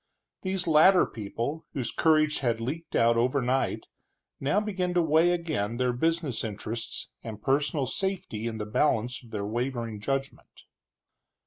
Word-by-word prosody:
These 190 -1 0
latter 170 +4 +6
people, 120 +8 -5
whose 130 -6 -3
courage 155 -1 +3
had 120 -3 0
leaked 150 +8 -5
out 115 0 +4
overnight, 130 +2 +1 0.5
now 145 +9 +2
began 185 -4 -2
to 175 - +5
weigh 160 +2 +4
again 155 -11 -1
their 125 0 +1
business 160 -2 0
interests 115 +2 -4
and 110 -2 -7
personal 140 +3 +1
safety 185 - -2
in 110 -1 -4
the 105 - -3
balance 120 +1 +1
of 120 - -15
their 105 -2 -3
wavering 115 -1 -3
judgment. 135 +4 -4
135 Hz, 140 wpm, -28 LUFS, 115-160 Hz, 0.5 s, latter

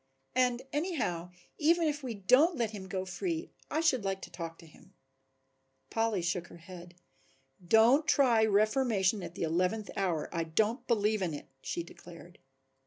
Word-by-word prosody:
And 250 -1 +1
anyhow 275 - -2 0.3
even 330 +2 +3
if 295 -1 -2
we 250 -4 -5
don't 255 - +4
let 230 -3 0
him 195 -3 -8
go 190 -1 -3
free 330 - -3 0.2
I 315 - 0
should 260 -9 +2
like 195 -1 -2
to - - -9
talk 165 -2 -6
to - - -15
him." 185 +4 -19 1.0
Polly 225 -5 0
shook 175 0 -1
her - - -13
head. 175 0 -12 0.7
"Don't 230 - +5
try 245 -8 +4
reformation 215 -1 +2
at 170 - -8
the - - -3
eleventh 180 +6 0
hour, 175 -6 -1
I 165 -1 -1
don't 215 - 0
believe 215 -2 +1
in 170 -5 -1
it," 145 - -10
she 170 - -3
declared. 175 0 -14
210 Hz, 165 wpm, -31 LUFS, 175-255 Hz, 1.0 s, Don't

